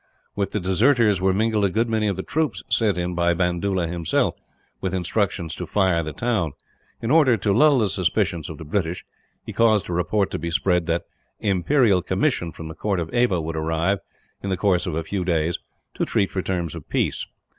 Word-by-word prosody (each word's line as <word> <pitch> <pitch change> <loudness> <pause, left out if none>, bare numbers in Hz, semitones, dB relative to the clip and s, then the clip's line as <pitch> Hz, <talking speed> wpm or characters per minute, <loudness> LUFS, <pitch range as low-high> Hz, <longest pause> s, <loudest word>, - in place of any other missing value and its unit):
With 100 -1 -1
the 105 - -1
deserters 105 +2 +3
were 95 0 +3
mingled 110 +2 +1
a 100 - +3
good 115 +5 +1
many 110 -2 0
of 100 - 0
the 95 - -4
troops 140 - -1
sent 105 -5 +2
in 90 0 -2
by 85 0 +2
Bandoola, 90 +1 0
himself, 85 -1 0 0.5
with 95 -1 -1
instructions 90 -2 -1
to 90 - -6
fire 95 -5 +2
the 75 -1 -4
town. 100 -4 -1 0.5
In 115 - 0
order 145 -7 +5
to 100 0 +1
lull 145 +5 +5
the 110 -4 +2
suspicions 90 -3 0
of 80 - -7
the 80 - -9
British, 85 +1 -2 0.4
he - - -6
caused 110 -4 +3
a - - -1
report 95 +3 0
to - - -3
be 85 +2 -3
spread 90 -1 +1
that 85 +1 0 0.4
an 105 - -1
imperial 100 +1 +3
commissioner 95 - 0
from 80 +1 -9
the 80 - -7
court 100 +2 -1
of 85 +3 -4
Ava 120 -7 +2
would 80 0 -4
arrive, 80 +5 0 0.4
in 100 - -4
the 95 - 0
course 90 -3 +1
of 85 - -2
a 80 - -1
few 95 +3 -2
days, 85 -1 0 0.3
to - - -2
treat 100 - +1
for 95 - -1
terms 90 -4 -2
of - - -10
peace. - - -1
95 Hz, 210 wpm, -23 LUFS, 85-105 Hz, 0.5 s, order